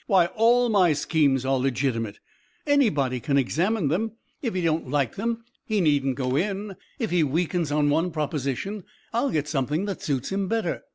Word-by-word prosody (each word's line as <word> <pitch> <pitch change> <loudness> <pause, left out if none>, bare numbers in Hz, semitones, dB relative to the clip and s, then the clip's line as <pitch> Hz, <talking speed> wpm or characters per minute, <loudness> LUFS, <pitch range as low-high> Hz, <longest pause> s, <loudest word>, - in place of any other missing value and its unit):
"Why, 190 -5 +5
all 240 +2 +4
my 185 -7 +4
schemes 145 -3 +1
are 135 0 +2
legitimate. 125 -5 -1 0.5
Anybody 155 - +2
can 140 +3 0
examine 170 - +1
them. 215 +8 -1 0.3
If 235 -7 -2
he 185 - 0
don't 160 -5 0
like 140 -4 0
them, 230 +2 -2 0.2
he 215 -2 0
needn't 140 -6 +2
go 130 0 -1
in. 195 +4 -2 0.2
If 230 -8 -2
he 175 -2 +3
weakens 165 +2 0
on 145 0 +2
one 165 +4 +2
proposition, 150 - -3 0.3
I'll 240 +4 +1
get 150 -2 -1
something 150 +5 -1
that 200 -3 -4
suits 135 0 -2
him 195 0 -1
better. 225 +2 -1
160 Hz, 175 wpm, -25 LUFS, 140-200 Hz, 0.5 s, Why